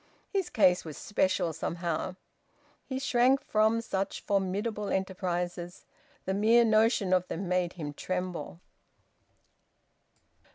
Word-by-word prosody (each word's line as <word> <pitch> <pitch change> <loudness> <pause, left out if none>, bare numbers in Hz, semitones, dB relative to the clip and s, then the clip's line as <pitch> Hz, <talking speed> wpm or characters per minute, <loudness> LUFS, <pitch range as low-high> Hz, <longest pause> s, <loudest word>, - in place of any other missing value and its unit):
His 385 -3 0
case 185 -5 +4
was 155 -3 -8
special, 185 -4 0
somehow... 170 +2 -3 0.7
He 260 - -3
shrank 260 0 +3
from 220 0 +2
such 195 -4 -3
formidable 205 +2 -1
enterprises. 180 -2 -3 0.4
The 190 - -1
mere 225 +4 +5
notion 215 -3 +3
of 185 0 +2
them 185 +3 -4
made 180 -1 0
him 150 -5 -6
tremble. 180 0 -4
190 Hz, 110 wpm, -29 LUFS, 180-220 Hz, 0.7 s, mere